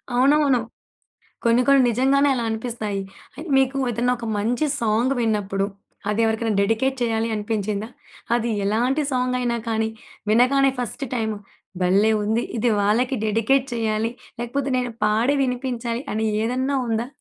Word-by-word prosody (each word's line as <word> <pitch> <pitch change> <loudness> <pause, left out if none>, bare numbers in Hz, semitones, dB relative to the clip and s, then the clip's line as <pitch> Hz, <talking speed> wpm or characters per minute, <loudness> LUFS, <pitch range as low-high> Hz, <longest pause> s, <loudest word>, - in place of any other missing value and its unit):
అవునవును. 275 0 +4 0.9
కొన్ని 235 +1 +4
కొన్ని 275 -1 +6
నిజంగానే 270 +4 +3
అలా 240 -2 -2
అనిపిస్తాయి. 220 -3 -3 0.5
మీకు 265 0 +2
ఏదన్నా 240 +2 +1
ఒక 235 - -6
మంచి 240 +8 0
సాంగ్ 230 +3 +2
విన్నప్పుడు 205 -3 0 0.4
అది 210 +2 0
ఎవరికైనా 220 0 0
డెడికేట్ 225 +6 +1
చేయాలి 225 -1 0
అనిపించిందా? 210 0 -2 0.5
అది 235 0 0
ఎలాంటి 245 +8 +1
సాంగ్ 250 0 0
అయినా 240 -1 0
కానీ 220 0 0 0.4
వినగానే 265 +4 +4
ఫస్ట్ 250 +3 -3
టైమ్ 220 -2 -1 0.5
భల్లే 200 +5 +4
ఉంది. 220 +3 0
ఇది 230 +2 +1
వాళ్ళకి 235 +6 +1
డెడికేట్ 225 +5 +2
చేయాలి. 225 -1 0 0.3
లేకపోతే 255 +4 -2
నేను 250 -1 -1
పాడి 220 +6 +2
వినిపించాలి 250 -2 -2
అని 220 +1 -1 0.2
ఏదన్నా 260 +4 0
ఉందా? 225 +1 -1
235 Hz, 135 wpm, -23 LUFS, 220-255 Hz, 0.9 s, కొన్ని